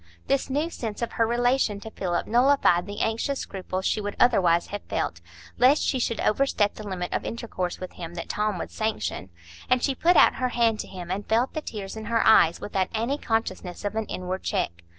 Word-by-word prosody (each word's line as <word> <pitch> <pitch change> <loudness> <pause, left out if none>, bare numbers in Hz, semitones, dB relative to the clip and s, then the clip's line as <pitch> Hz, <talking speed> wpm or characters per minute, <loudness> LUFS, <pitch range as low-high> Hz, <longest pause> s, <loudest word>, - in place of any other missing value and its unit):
This 275 0 0
new 295 +5 -1
sense 225 -4 -4
of 235 - -2
her 230 - +1
relation 240 -3 +1
to 220 - -8
Philip 175 -4 -2
nullified 240 -7 +3
the 205 0 -5
anxious 230 +5 0
scruples 190 -1 -5
she 215 - +1
would 205 0 -4
otherwise 180 -8 +4
have 205 - -3
felt, 85 0 -2 0.4
lest 265 +4 +5
she 260 - 0
should 230 -1 -1
overstep 215 -4 +2
the 215 - -9
limit 180 -2 -4
of - - -1
intercourse 185 -6 -4
with 185 - -6
him 170 0 -8
that 170 - -5
Tom 210 -2 -1
would - - -5
sanction; 215 - -3 0.4
and 255 -1 +3
she 275 - +2
put 345 +7 +3
out - - +6
her 255 -1 0
hand 230 -3 +2
to - - -4
him, 180 -2 -7
and 200 +2 -4
felt 230 +4 +2
the 310 - -3
tears 205 -8 -6
in 220 0 -7
her 230 +1 +1
eyes 170 -6 +6
without 190 -2 -1
any 240 +6 -1
consciousness 205 -5 -2
of 205 - -1
an 220 -1 -2
inward 185 +1 -4
check. 85 0 -2
215 Hz, 210 wpm, -26 LUFS, 185-240 Hz, 0.4 s, out